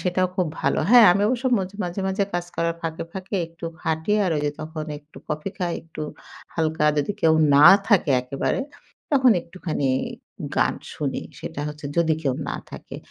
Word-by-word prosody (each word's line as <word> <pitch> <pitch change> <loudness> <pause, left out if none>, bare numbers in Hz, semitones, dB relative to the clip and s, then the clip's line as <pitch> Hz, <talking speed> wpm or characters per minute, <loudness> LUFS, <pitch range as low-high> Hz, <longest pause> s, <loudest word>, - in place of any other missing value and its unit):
সেটাও 185 0 +1
খুব 185 - +1
ভালো। - - +1
হ্যাঁ, 240 -3 +9
আমি 200 - +1
অবশ্য 250 +2 -1
মজ 190 -1 -3
মাঝে, 175 +2 -4
মাঝে 195 +1 +1
কাজ 175 0 -1
করার 170 0 0
ফাঁকে, 165 -1 -3
ফাঁকে 190 +1 -4
একটু 165 +1 -12 0.2
হাটি। 160 +5 0
আর 180 - +1
ঐ - - 0
যে 145 - +1
তখন 155 0 -5
একটু 145 +1 -25
কফি 150 +5 -3
খাই। 175 -3 -1
একটু 165 -1 -8 0.5
হালকা, 160 -1 0
যদি 145 +8 0
কেউ 160 -1 +5 0.2
না 145 +2 +9 0.2
থাকে? 195 -9 +4
একেবারে, 135 - -1 0.5
তখন 260 -2 +5
একটুখানি 165 -5 -3 0.7
গান - - +3 0.2
শুনি। - - -3 0.2
সেটা - - -6
হচ্ছে 150 -1 -7
যদি 165 -2 +3
কেউ 135 -4 +1
না - - -2
থাকে? - - -9
170 Hz, 180 wpm, -23 LUFS, 155-190 Hz, 0.7 s, হ্যাঁ